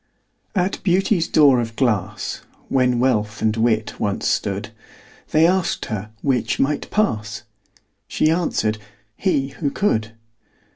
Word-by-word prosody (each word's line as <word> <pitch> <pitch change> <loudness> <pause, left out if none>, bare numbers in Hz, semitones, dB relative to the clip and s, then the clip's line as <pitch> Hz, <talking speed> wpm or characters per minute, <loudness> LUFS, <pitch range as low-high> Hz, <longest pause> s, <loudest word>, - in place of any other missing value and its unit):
At 185 0 0
Beauty's 185 -1 +2
door 140 -5 +5
of 115 -1 -3
glass, 105 -5 -1 0.3
When 125 -2 +2
Wealth 110 -4 +1
and 110 -1 +1
Wit 110 -1 0
once 100 -1 -1
stood, - - -1 0.6
They 155 +1 +4
asked 185 0 +1
her 105 -2 -4
'which 130 -4 0
might 145 +2 0
pass?" 110 - -1 0.6
She 155 - +2
answered, 110 -11 0 0.4
"he, 140 -8 0
who 145 +1 -3
could." 110 - 0
125 Hz, 125 wpm, -21 LUFS, 110-160 Hz, 0.6 s, door